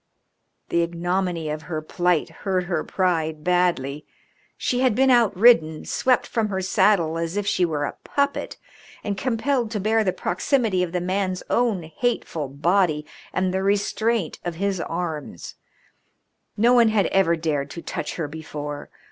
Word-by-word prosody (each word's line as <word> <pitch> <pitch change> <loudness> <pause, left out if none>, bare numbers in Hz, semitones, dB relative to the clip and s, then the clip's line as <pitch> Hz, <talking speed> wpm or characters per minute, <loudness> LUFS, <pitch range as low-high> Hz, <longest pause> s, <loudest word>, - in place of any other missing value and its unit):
The 170 - +2
ignominy 175 0 -1
of 155 0 -4
her 155 0 -4
plight 175 +1 0
hurt 185 -2 0
her 175 0 -2
pride 160 -5 -1
badly. 170 -6 +1 0.5
She 250 - -1
had 255 -4 +3
been 265 +2 +4
outridden, 210 -8 +4
swept 255 -1 +1
from 225 -2 -1
her 190 -1 -2
saddle 180 -3 +2
as 165 +3 -3
if 205 - -1
she 185 -3 +2
were 150 -3 -1
a - - -4
puppet, 280 0 -1 0.5
and 205 - -2
compelled 245 +2 0
to 215 -1 -3
bear 220 +3 +2
the 190 - +1
proximity 190 +2 0
of 180 -2 -1
the 180 0 -1
man's 185 0 -1
own 230 -7 +1
hateful 160 - -2
body 155 +2 +1 0.3
and 185 +1 0
the 190 - 0
restraint 205 0 0
of 175 -2 -3
his 195 +1 -1
arms. 165 - -5 1.0
No 235 +4 +4
one 240 -2 +6
had 215 -3 +2
ever 190 -3 +3
dared 150 -4 -2
to 170 - -8
touch - - -4
her 165 -4 -3
before. 150 -1 -7
180 Hz, 155 wpm, -23 LUFS, 160-210 Hz, 1.0 s, one